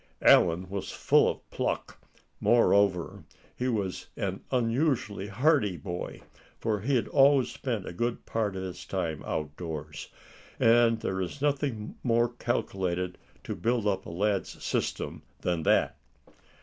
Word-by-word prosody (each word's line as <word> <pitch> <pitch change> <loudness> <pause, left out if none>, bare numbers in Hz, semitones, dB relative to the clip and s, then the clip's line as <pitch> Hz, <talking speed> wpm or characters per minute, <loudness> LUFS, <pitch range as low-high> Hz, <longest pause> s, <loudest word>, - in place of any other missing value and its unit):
Allan 90 +2 +5
was 100 +1 -4
full - - +3
of - - -6
pluck. - - -3 0.4
Moreover, 100 -6 +3 0.3
he 125 - -2
was 100 -7 -2
an - - -2
unusually 120 -5 0
hardy 105 - +2
boy, 90 -2 -6 0.4
for 110 -2 -1
he 135 +6 +1
had 120 - +1
always 135 -3 +5
spent 115 -8 -3
a - - -6
good 120 +6 -2
part 105 -4 -1
of 95 - -4
his 90 -2 -6
time 80 -2 -3
outdoors; 75 0 -5 0.5
and 115 0 +5
there 95 0 -2
is 95 +10 -4
nothing 135 -6 -1
more 120 -1 +2
calculated 90 -7 -2 0.2
to - - -4
build 115 -1 0
up 95 -2 0
a - - -6
lad's 100 +3 -1
system - - -2 0.2
than 85 -2 0
that. - - +2
105 Hz, 135 wpm, -28 LUFS, 90-120 Hz, 0.5 s, Allan